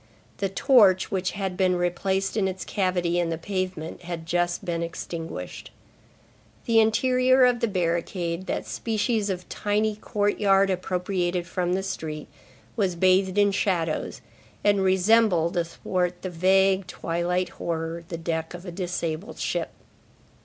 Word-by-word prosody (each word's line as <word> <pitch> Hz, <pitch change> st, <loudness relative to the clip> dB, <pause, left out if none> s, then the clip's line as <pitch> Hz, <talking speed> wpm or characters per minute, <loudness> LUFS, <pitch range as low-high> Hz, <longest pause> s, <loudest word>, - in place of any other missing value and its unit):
The 195 Hz, -, -1 dB
torch, 200 Hz, -4 st, +4 dB
which 185 Hz, -1 st, -1 dB
had 195 Hz, -3 st, -3 dB
been 185 Hz, -1 st, +2 dB
replaced 190 Hz, +3 st, -1 dB
in 205 Hz, -3 st, +2 dB
its 190 Hz, 0 st, -5 dB
cavity 180 Hz, -3 st, 0 dB
in 170 Hz, -1 st, 0 dB
the 165 Hz, -, -2 dB
pavement, 185 Hz, -2 st, -4 dB
had 170 Hz, -2 st, -6 dB
just 175 Hz, +2 st, 0 dB
been 170 Hz, -2 st, -2 dB
extinguished. 165 Hz, -, -6 dB, 1.0 s
The 230 Hz, -1 st, +4 dB
interior 255 Hz, +3 st, +4 dB
of 245 Hz, -1 st, +3 dB
the 235 Hz, -, +1 dB
barricade, 170 Hz, -1 st, -2 dB
that -, -, -2 dB
species 220 Hz, -1 st, -1 dB
of 180 Hz, -2 st, -4 dB
tiny 210 Hz, +1 st, 0 dB
courtyard 205 Hz, -2 st, +2 dB
appropriated 180 Hz, -1 st, -1 dB
from 180 Hz, 0 st, -1 dB
the 190 Hz, +1 st, 0 dB
street, 155 Hz, -5 st, -5 dB, 0.5 s
was 195 Hz, -5 st, 0 dB
bathed 185 Hz, +2 st, +3 dB
in 205 Hz, 0 st, +5 dB
shadows, 175 Hz, -5 st, -1 dB, 0.4 s
and 205 Hz, -1 st, +3 dB
resembled, 190 Hz, -2 st, +3 dB
athwart 175 Hz, +1 st, -2 dB
the 185 Hz, -, -3 dB
vague, 190 Hz, +2 st, +3 dB
twilight 180 Hz, +1 st, -1 dB
horror, 165 Hz, 0 st, -4 dB
the 170 Hz, -2 st, -5 dB
deck 165 Hz, 0 st, -3 dB
of 175 Hz, +2 st, -10 dB
a 180 Hz, -, -6 dB
disabled 175 Hz, +1 st, -4 dB
ship. -, -, -2 dB
185 Hz, 140 wpm, -25 LUFS, 170-200 Hz, 1.0 s, in